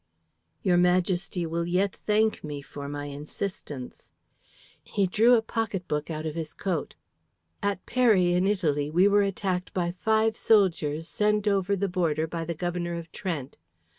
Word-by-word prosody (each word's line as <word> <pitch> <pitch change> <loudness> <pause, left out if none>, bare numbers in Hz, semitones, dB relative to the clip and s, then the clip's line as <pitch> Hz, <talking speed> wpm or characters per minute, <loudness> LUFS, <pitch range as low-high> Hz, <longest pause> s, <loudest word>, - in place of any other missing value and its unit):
"Your 180 -3 +3
Majesty 180 0 +1
will 170 +1 -2
yet 185 +3 +1
thank 215 +1 +2
me 145 -2 -5
for 140 0 -7
my 145 0 -4
insistence." 145 -1 -6 0.7
He 200 -2 0
drew 225 +6 +5
a 225 - +2
pocket 215 -6 -3
book 150 +1 -2
out 155 -1 -4
of 155 - -2
his 160 -1 -5
coat. 180 -6 -3 0.7
"At 200 -2 -2
Peri 210 -9 +3
in 180 +2 +2
Italy 150 -8 +1
we 180 +5 +4
were 205 0 +4
attacked 190 -2 -2
by 175 -2 0
five 220 +4 +1
soldiers 165 -7 +2
sent 210 0 +1
over 200 -1 +2
the 200 +1 0
border 165 -4 0
by 165 0 -4
the 170 0 -3
Governor 175 0 -2
of 165 -1 -7
Trent. 150 -8 -4
180 Hz, 160 wpm, -27 LUFS, 160-200 Hz, 0.7 s, drew